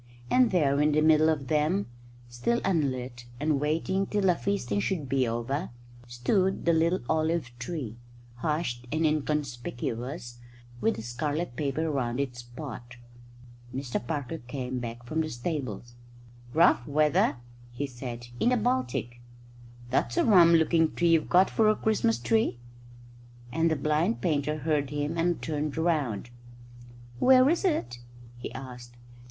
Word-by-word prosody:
And 250 Hz, -2 st, +5 dB
there, 145 Hz, -6 st, +2 dB
in 150 Hz, 0 st, +3 dB
the 155 Hz, -, +3 dB
middle 155 Hz, 0 st, +5 dB
of 145 Hz, -4 st, -1 dB
them, 155 Hz, +7 st, +1 dB, 0.4 s
still 120 Hz, -, 0 dB
unlit 130 Hz, -8 st, -1 dB
and 150 Hz, -1 st, +1 dB
waiting 165 Hz, +6 st, 0 dB
till 205 Hz, -1 st, -1 dB
the 180 Hz, -2 st, +4 dB
feasting 165 Hz, -, -1 dB
should 150 Hz, -, -2 dB
be 130 Hz, -1 st, +1 dB
over, 120 Hz, +8 st, -2 dB, 0.4 s
stood 185 Hz, -, 0 dB
the 170 Hz, -, +4 dB
little 165 Hz, +3 st, +2 dB
olive 160 Hz, -4 st, 0 dB
tree, 125 Hz, -4 st, -5 dB, 0.4 s
hushed 125 Hz, -4 st, -2 dB
and 160 Hz, +2 st, +1 dB
inconspicuous, 125 Hz, -4 st, -3 dB, 0.4 s
with 225 Hz, -, +1 dB
the -, -, -7 dB
scarlet 145 Hz, +5 st, -3 dB
paper 155 Hz, +3 st, -1 dB
round 125 Hz, -3 st, -1 dB
its 125 Hz, -3 st, -3 dB
pot. 120 Hz, -1 st, -9 dB, 0.8 s
Mr 130 Hz, -3 st, -3 dB
Parker 145 Hz, +3 st, -4 dB
came 125 Hz, 0 st, -4 dB
back 120 Hz, 0 st, -6 dB
from 155 Hz, +6 st, -1 dB
the 155 Hz, -, -2 dB
stables. 120 Hz, -, -4 dB, 0.6 s
"Rough 160 Hz, -5 st, +4 dB
weather," 150 Hz, 0 st, +3 dB, 0.4 s
he 125 Hz, +4 st, -3 dB
said, 120 Hz, -2 st, -7 dB
"in 240 Hz, -, +3 dB
the 250 Hz, -, +3 dB
Baltic. 165 Hz, -, -1 dB, 0.7 s
That's 120 Hz, -2 st, 0 dB
a -, -, +4 dB
rum 175 Hz, -6 st, +7 dB
looking 160 Hz, 0 st, +3 dB
tree 175 Hz, 0 st, +2 dB
you've 165 Hz, -2 st, +3 dB
got 185 Hz, +2 st, +5 dB
for 220 Hz, -1 st, +3 dB
a 215 Hz, -, +4 dB
Christmas 220 Hz, +1 st, +1 dB
tree," 225 Hz, -, +1 dB, 0.9 s
and 165 Hz, +5 st, +2 dB
the 160 Hz, -, +1 dB
blind 155 Hz, -, +1 dB
painter 150 Hz, -3 st, 0 dB
heard 150 Hz, -2 st, 0 dB
him 145 Hz, +2 st, -2 dB
and 170 Hz, +1 st, +1 dB
turned 150 Hz, -1 st, -2 dB
round. 145 Hz, -, 0 dB, 0.9 s
"Where 260 Hz, 0 st, +6 dB
is 345 Hz, -, 0 dB
it?" 120 Hz, -, 0 dB, 0.4 s
he -, -, -6 dB
asked. 125 Hz, -2 st, -9 dB
150 Hz, 145 wpm, -28 LUFS, 120-165 Hz, 0.9 s, rum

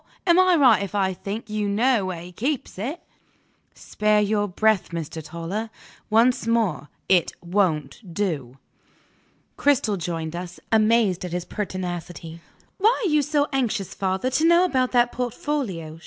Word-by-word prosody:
Am 345 Hz, -1 st, +5 dB
I 370 Hz, -1 st, +5 dB
right 255 Hz, -9 st, +5 dB
if 200 Hz, +1 st, -5 dB
I 190 Hz, -2 st, +1 dB
think 205 Hz, +5 st, -6 dB
you 210 Hz, -1 st, -2 dB
know 220 Hz, -1 st, +2 dB
where 175 Hz, -3 st, -5 dB
he 175 Hz, +1 st, -10 dB
keeps 255 Hz, -, -3 dB
it?" 275 Hz, -, -4 dB, 0.7 s
"Spare 210 Hz, 0 st, +1 dB
your 205 Hz, 0 st, +1 dB
breath, 215 Hz, +1 st, +1 dB
Mr. 165 Hz, -1 st, -5 dB
Toller. 170 Hz, +8 st, -5 dB, 0.4 s
Once 230 Hz, +1 st, +3 dB
more, 210 Hz, -11 st, 0 dB, 0.2 s
it 180 Hz, -3 st, +3 dB
won't 170 Hz, -, 0 dB
do!" 155 Hz, -10 st, -3 dB, 1.0 s
Cristel 250 Hz, -8 st, +2 dB
joined 165 Hz, -1 st, -4 dB
us, 175 Hz, 0 st, -7 dB
amazed 215 Hz, -4 st, +3 dB
at 180 Hz, -2 st, -5 dB
his 180 Hz, 0 st, -3 dB
pertinacity. 175 Hz, -4 st, -5 dB, 0.4 s
"Why 440 Hz, +5 st, +3 dB
are -, -, +2 dB
you 300 Hz, 0 st, +4 dB
so 290 Hz, 0 st, +1 dB
anxious, 220 Hz, -8 st, -1 dB
father, 190 Hz, +6 st, -1 dB
to 305 Hz, -, +1 dB
know 340 Hz, +2 st, +5 dB
about 260 Hz, -7 st, +1 dB
that 240 Hz, 0 st, +3 dB
portfolio?" 240 Hz, -, -3 dB
205 Hz, 150 wpm, -24 LUFS, 175-245 Hz, 1.0 s, Am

